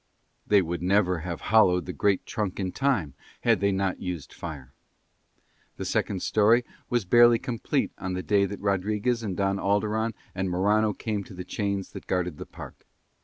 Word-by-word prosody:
They 100 -2 +5
would 85 0 -4
never 90 -1 +2
have 85 +1 -5
hollowed 90 -5 +5
the 90 - -5
great 100 0 +1
trunk 105 -7 -3
in 95 -2 -2
time 110 - 0 0.3
had - - +3
they 100 0 +2
not 95 -1 -1
used 90 -5 -5
fire. 70 -6 -8 1.0
The - - -4
second 95 -3 -1
storey 115 +3 +4 0.2
was 120 -4 0
barely 120 +4 +6
complete 120 -3 -2
on 95 0 -3
the 90 0 -3
day 100 -1 +3
that 100 0 -6
Rodriguez 105 +4 0
and 100 -5 -4
Don 100 0 +1
Alderon 105 +3 0 0.2
and 95 0 -2
Morano 105 +4 +2
came 105 0 -3
to 95 - -12
the 90 0 -7
chains 100 -2 -2
that - - -10
guarded 90 -4 -1
the - - -7
park. - - -11
100 Hz, 175 wpm, -27 LUFS, 90-110 Hz, 1.0 s, barely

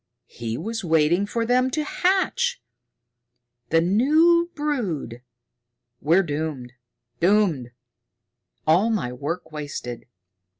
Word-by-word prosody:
He 115 -1 -5
was 225 0 -4
waiting 165 +3 +2
for 230 +2 -1
them 250 +2 +2
to 305 +3 -1
hatch! 385 +9 0 1.1
The 165 0 +3
new 310 - +4
brood! 205 - -3 0.8
We're 170 +6 +3
doomed 145 -6 -4 0.5
doomed! 175 - +2 1.0
All 175 +8 +4
my 165 - -1
work 160 +5 -5
wasted!" 145 -6 -6
180 Hz, 95 wpm, -23 LUFS, -, 1.1 s, new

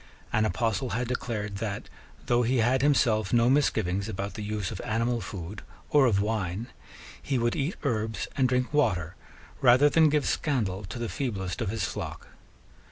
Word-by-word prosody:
An 110 - +3
apostle 115 +1 0
had 125 0 -1
declared 105 -5 -3
that, 100 -1 -4 0.4
though 120 0 +3
he 125 +2 +1
had 120 +3 +3
himself 120 -8 +3
no 120 +1 +4
misgivings 100 -8 +1
about 100 0 -4
the 110 - -6
use 105 -3 -3
of - - -5
animal 115 +2 0
food 95 +1 -7 0.3
or 145 -3 +6
of 100 -4 +2
wine, 105 +1 -2 0.5
he 135 - -1
would 120 0 +1
eat 150 +4 -1
herbs 110 -5 -1
and 130 -2 +2
drink 125 +2 0
water 90 - +1 0.5
rather 130 +3 +6
than 160 +1 +5
give 150 -1 +1
scandal 105 -9 -1
to 100 +5 -7
the 120 -1 -3
feeblest 100 -8 -3
of 110 - -1
his 110 +2 -2
flock. - - -5
115 Hz, 170 wpm, -28 LUFS, 100-130 Hz, 0.5 s, or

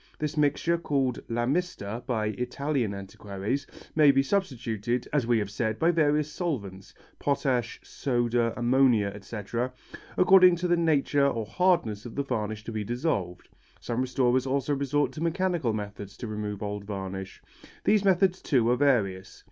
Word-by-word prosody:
This 150 +1 -3
mixture, 155 +3 +1
called 135 -6 0
la 120 +1 0
mista 125 - -2
by 110 -4 0
Italian 125 -1 -1
antiquaries, 100 +6 -4 0.3
may 155 -2 +6
be 135 0 +4
substituted, 125 - -1
as 140 -6 +1
we 120 -1 +3
have 100 -2 -2
said, 110 +1 -1
by 165 +2 +3
various 150 -2 +2
solvents 100 - -4 0.2
potash, 125 -5 0
soda, 120 -2 0
ammonia, 120 -4 +3
etc. 115 +4 -4 0.5
according 185 -1 +7
to 175 +1 -2
the 175 - +3
nature 145 -4 +2
or 115 -5 -1
hardness 115 - +1
of 115 - -10
the 140 - 0
varnish 110 -5 -3
to 115 - -6
be 110 -1 -3
dissolved. 105 - -2 0.3
Some 120 +1 -2
restorers 130 0 +1
also 140 +2 0
resort 140 +1 0
to 155 - -8
mechanical 170 -5 0
methods 105 -1 -6
to - - -6
remove 105 -2 -4
old 105 0 -4
varnish. 95 -1 -6 0.4
These 210 -1 +3
methods, 190 -1 +3
too, 125 -6 +2
are - - +4
various. 105 -10 +1
125 Hz, 155 wpm, -27 LUFS, 105-150 Hz, 0.5 s, according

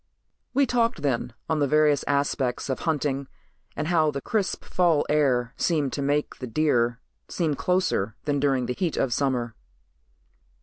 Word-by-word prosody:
We 280 +1 +4
talked 235 - 0
then 125 -3 0 0.2
on 160 -1 0
the 145 - +2
various 150 0 +3
aspects 140 -2 0
of 130 - -1
hunting 140 -3 -1 0.5
and 150 +2 -2
how 160 -3 +3
the 140 -2 -3
crisp 200 +6 -2
fall 170 -5 +2
air 130 -5 +2
seemed 150 -6 0
to 140 - -2
make 145 +2 0
the 125 - -5
deer 120 -3 +1 0.3
seem 160 -4 0
closer 145 - 0
than 145 -1 0
during 135 -3 +1
the 125 - -2
heat 175 +1 -2
of 130 -3 +1
summer. 125 -4 0
145 Hz, 160 wpm, -25 LUFS, 130-155 Hz, 0.5 s, We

